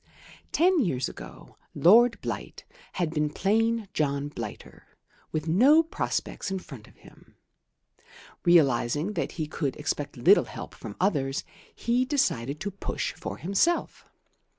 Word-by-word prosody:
Ten 360 +1 +3
years 135 - 0
ago - - -11 0.2
Lord 230 +7 +6
Blight - - -6 0.3
had 175 -4 -1
been 150 -2 0
plain 225 +6 +1
John 140 -1 -1
Blighter, 115 -7 -9 0.3
with 155 0 -3
no 265 - +6
prospects 325 - -3
in 190 - -2
front 135 - -11
of - - -20
him. - - -19 1.1
Realizing 150 - +3
that - - -3
he 160 - -3
could 145 -3 -3
expect - - -3
little - - +5
help - - -9
from 105 -3 -9
others, 140 -8 0 0.3
he 240 +2 +1
decided 155 - 0
to 200 +1 -3
push 195 - -4
for 95 +1 -7
himself. 200 - 0
170 Hz, 130 wpm, -27 LUFS, 140-230 Hz, 1.1 s, Lord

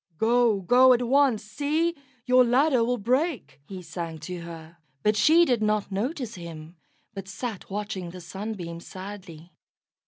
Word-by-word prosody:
"Go, 230 -1 +3
go 255 +7 +6
at 245 0 +1
once. 265 -4 +3
See! 295 +10 -1 0.3
your 255 0 +5
ladder 255 +1 +3
will 245 +2 0
break," 250 - -1
he 190 -2 -8
sang 165 -1 -6
to 180 +3 -6
her; 165 0 -10 0.3
but 210 0 +3
she 325 +9 +5
did 245 -7 +1
not 210 -1 0
notice 240 - -3
him, 165 -1 -9 0.4
but 195 -2 -7
sat 200 +2 -6
watching 200 -3 -4
the 180 +2 -10
Sunbeam 180 -1 -6
sadly. 185 -3 -10
210 Hz, 150 wpm, -26 LUFS, 180-250 Hz, 0.4 s, go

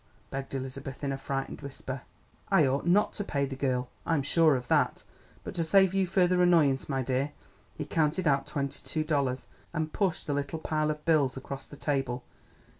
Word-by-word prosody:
begged 135 0 -4
Elizabeth 135 +1 -6
in 140 - 0
a - - -1
frightened 135 +1 -3
whisper. 135 -2 -6 0.5
"I - - +5
ought 135 +5 0
not 200 +4 +4
to 205 - -3
pay 140 -7 0
the 135 0 -5
girl, 130 -2 0 0.2
I'm 160 -4 +1
sure 155 +1 +5
of 125 -1 -4
that; - - +2 0.4
but - - -6
to 170 -2 0
save 190 +2 +5
you 195 -1 +2
further 180 -1 +3
annoyance, 155 -7 +4
my 135 -2 0
dear 135 +3 -1 0.2
" - - -33
He - - -3
counted 160 +2 +1
out 140 -1 +2
twenty 140 0 -3
two 155 - -1
dollars, 140 -5 0 0.3
and 155 -1 -1
pushed 190 -6 0
the 145 - -1
little 140 +3 -2
pile 155 -1 0
of 150 0 -4
bills 145 -6 +3
across 135 +1 -6
the 145 - -11
table. 135 -4 -1
145 Hz, 195 wpm, -29 LUFS, 135-160 Hz, 0.5 s, I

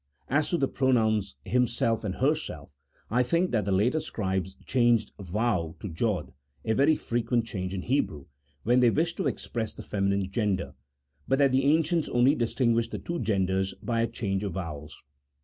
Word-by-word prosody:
As 145 +2 +1
to 175 - +1
the 135 - +1
pronouns 110 - +1
himself 115 -2 +1
and 95 -3 -3
herself, 135 - -1 0.4
I 120 +2 +3
think 170 +9 +1
that 110 -5 +1
the 100 - -1
later 110 +11 +2
scribes 95 - -3
changed 120 -4 +2
vau 95 -3 -1
into 100 - -5
jocl 95 -2 -1 0.3
(a 110 - +2
very 140 +6 +4
frequent 120 -2 -1
change 95 -4 -4
in 95 -1 -4
Hebrew) 120 - -1 0.4
when 120 +3 +4
they 125 -1 +6
wished 165 +7 0
to - - 0
express 115 -2 -3
the - - -9
femi 100 -1 -1
nine 100 -1 0
gender, 100 -2 -1 0.5
but 135 - +2
that 140 -1 +4
the 130 +1 +2
ancients 160 +2 +2
only 125 +3 +4
distinguished 115 -3 +1
the - - -4
two 170 0 -4
genders 95 -3 0
by 115 -2 -1
a 115 - +2
change 95 -3 -2
of 100 -4 -3
vowels. 75 -5 -7
115 Hz, 180 wpm, -28 LUFS, 95-130 Hz, 0.5 s, they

